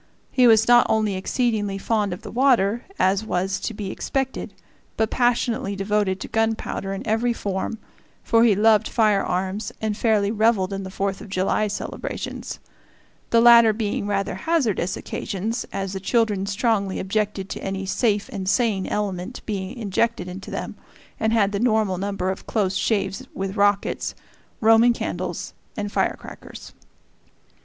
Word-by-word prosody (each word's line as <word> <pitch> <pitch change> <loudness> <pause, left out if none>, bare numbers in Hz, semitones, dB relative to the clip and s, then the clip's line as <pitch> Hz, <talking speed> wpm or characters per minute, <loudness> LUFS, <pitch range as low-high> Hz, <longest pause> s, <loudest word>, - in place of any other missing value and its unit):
He 250 -2 +5
was 225 -1 +5
not 240 0 +6
only 215 -2 +2
exceedingly 205 0 -1
fond 210 0 0
of 180 - -6
the - - -8
water, 240 -3 +2
as 195 +2 +2
was 190 -2 -1
to - - -3
be 205 -3 -5
expected, 270 -1 -3 0.5
but 220 -1 +1
passionately 235 -4 +1
devoted 195 -1 0
to - - -5
gunpowder 225 -3 -1
in 195 - -5
every 230 +3 +1
form, 200 +1 -3 0.5
for 230 -1 +4
he 225 -4 +5
loved 215 +1 +4
firearms 200 -2 0
and 215 -1 -1
fairly 210 -3 +2
reveled 215 -3 +2
in 195 - -3
the 190 - -6
Fourth 195 0 -2
of 210 - -10
July 195 +3 +1
celebrations 205 - -5 0.7
the 230 - +4
latter 235 -2 +8
being 210 -2 -2
rather 200 -1 -1
hazardous 215 - 0
occasions, 220 +3 -4
as 195 -1 -3
the 190 - -3
children 205 -1 +1
strongly 200 -2 0
objected 200 0 -1
to - - -6
any 195 0 -3
"safe 205 0 0
and 190 -2 -3
sane" 215 -5 +1
element 200 +2 -3
being 200 +2 -4
injected 225 -2 -1
into 185 +2 -8
them, - - -4 0.5
and 220 0 +1
had 210 -3 +3
the 200 - -2
normal 215 -5 +1
number 195 -1 -1
of 190 - -8
close 195 -4 0
shaves 195 -2 -1
with 195 +1 -3
rockets, 205 -1 +1 0.5
Roman 225 +2 +6
candles, - - -4 0.2
and 205 -1 -3
firecrackers. - - -4
205 Hz, 150 wpm, -23 LUFS, 195-225 Hz, 0.7 s, latter